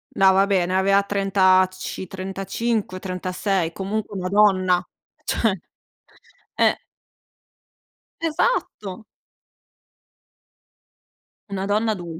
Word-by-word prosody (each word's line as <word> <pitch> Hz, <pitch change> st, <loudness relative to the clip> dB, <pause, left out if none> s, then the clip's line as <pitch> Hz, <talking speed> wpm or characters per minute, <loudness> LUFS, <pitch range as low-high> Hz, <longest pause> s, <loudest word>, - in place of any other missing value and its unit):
No, 190 Hz, 0 st, +6 dB
vabbè, 195 Hz, -2 st, +3 dB
ne 185 Hz, +1 st, -2 dB
aveva 195 Hz, +1 st, +3 dB
trentaci 185 Hz, -2 st, +1 dB
35-36, 190 Hz, -2 st, -2 dB
comunque 200 Hz, +2 st, -4 dB
una 185 Hz, 0 st, -3 dB
donna. 185 Hz, -3 st, +3 dB, 0.4 s
Cioè. 225 Hz, -3 st, +1 dB, 1.0 s
Eh! -, -, +2 dB, 1.4 s
Esatto! 305 Hz, -, -1 dB, 2.5 s
Una 195 Hz, -1 st, -3 dB
donna 215 Hz, +2 st, +1 dB
adul 170 Hz, -5 st, -6 dB
195 Hz, 75 wpm, -22 LUFS, 185-205 Hz, 2.5 s, No